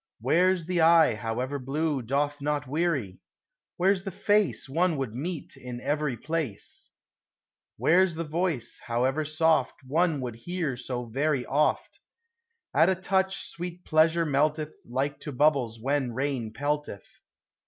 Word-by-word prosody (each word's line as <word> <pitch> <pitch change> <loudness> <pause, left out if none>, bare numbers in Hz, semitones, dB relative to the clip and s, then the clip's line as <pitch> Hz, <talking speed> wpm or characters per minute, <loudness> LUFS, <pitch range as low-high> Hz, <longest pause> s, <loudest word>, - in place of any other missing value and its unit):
Where 185 +3 +3
's 170 -3 -7
the 175 0 0
eye, 165 -4 +6
however 120 +6 -3
blue, 145 +2 -1
Doth 145 +4 -1
not 145 0 -1
weary? 140 - -1 0.6
Where 190 +3 +4
's 190 - -5
the 195 - -3
face 205 0 +1
One 165 +3 +1
would 130 -5 -3
meet 155 +6 -5
in 125 -1 -7
every 145 -1 -1
place? 155 -9 -4 0.9
Where 180 +3 +5
's 170 - -7
the 165 - -2
voice, 155 -6 -2
however 130 +5 +1
soft, 155 -2 +2
One 160 +2 +1
would 120 -3 -5
hear 165 0 -3
so 125 0 -4
very 135 +2 0
oft? 150 +3 0 0.7
At 160 +4 +5
a 190 - +2
touch 190 +1 0
sweet 175 +1 -7
Pleasure 165 +1 +3
melteth 150 +1 +1 0.2
Like 135 +3 -1
to 150 - -6
bubbles 130 -5 +2
when 135 0 0
rain 130 -3 -2
pelteth. 145 -4 -4
150 Hz, 145 wpm, -27 LUFS, 130-165 Hz, 0.9 s, eye